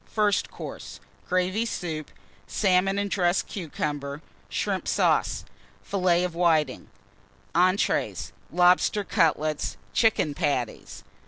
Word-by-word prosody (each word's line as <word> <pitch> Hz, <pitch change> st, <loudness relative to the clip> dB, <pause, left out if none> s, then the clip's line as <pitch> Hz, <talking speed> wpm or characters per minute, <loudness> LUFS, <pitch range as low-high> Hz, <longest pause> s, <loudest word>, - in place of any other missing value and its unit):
FIRST 210 Hz, -2 st, +1 dB
COURSE -, -, -8 dB, 0.3 s
Gravy 185 Hz, +4 st, +1 dB
Soup. 160 Hz, -9 st, -4 dB, 0.4 s
Salmon 195 Hz, 0 st, +2 dB
and 200 Hz, 0 st, 0 dB
Dressed 175 Hz, -1 st, +2 dB
Cucumber. 145 Hz, -4 st, -4 dB, 0.3 s
Shrimp -, -, -2 dB
Sauce. -, -, +1 dB, 0.4 s
Fillets 180 Hz, -, +2 dB
of 180 Hz, -, -4 dB
Whitings. 160 Hz, -5 st, +1 dB, 0.6 s
ENTREES. 185 Hz, +3 st, +1 dB, 0.2 s
Lobster 180 Hz, +3 st, +4 dB
Cutlets. 155 Hz, -4 st, +1 dB, 0.2 s
Chicken 220 Hz, -10 st, +2 dB
Patties. 140 Hz, -7 st, -2 dB
180 Hz, 95 wpm, -26 LUFS, 155-195 Hz, 0.6 s, Lobster